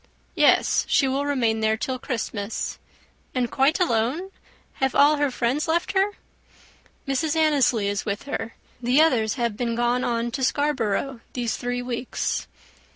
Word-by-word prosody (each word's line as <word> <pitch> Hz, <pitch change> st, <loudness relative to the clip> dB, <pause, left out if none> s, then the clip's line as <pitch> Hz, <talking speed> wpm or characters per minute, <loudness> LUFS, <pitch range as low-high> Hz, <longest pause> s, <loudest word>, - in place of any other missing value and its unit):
"Yes; -, -, +4 dB
she 275 Hz, -, +3 dB
will 275 Hz, +2 st, -1 dB
remain 235 Hz, -6 st, +1 dB
there 220 Hz, 0 st, +1 dB
till 255 Hz, +2 st, -3 dB
Christmas." 225 Hz, -4 st, -4 dB, 0.6 s
"And 245 Hz, -2 st, 0 dB
quite 275 Hz, +6 st, +2 dB
alone? 305 Hz, +5 st, 0 dB, 0.5 s
Have 265 Hz, -1 st, +1 dB
all 295 Hz, +1 st, +5 dB
her 290 Hz, -1 st, +1 dB
friends 250 Hz, +3 st, -1 dB
left 335 Hz, +2 st, 0 dB
her?" 395 Hz, +1 st, +1 dB, 0.9 s
"Mrs. 290 Hz, +3 st, 0 dB
Annesley 280 Hz, -9 st, +3 dB
is 205 Hz, 0 st, -1 dB
with 200 Hz, -1 st, -3 dB
her. 230 Hz, -5 st, -5 dB, 0.3 s
The 250 Hz, +4 st, +3 dB
others 240 Hz, -9 st, +3 dB
have 235 Hz, -4 st, -1 dB
been 235 Hz, 0 st, -2 dB
gone 240 Hz, +1 st, +1 dB
on 235 Hz, 0 st, -1 dB
to 260 Hz, +2 st, -3 dB
Scarborough 265 Hz, -3 st, 0 dB
these 240 Hz, -3 st, -1 dB
three 245 Hz, 0 st, -3 dB
weeks." 245 Hz, 0 st, -3 dB
250 Hz, 150 wpm, -24 LUFS, 230-285 Hz, 0.9 s, all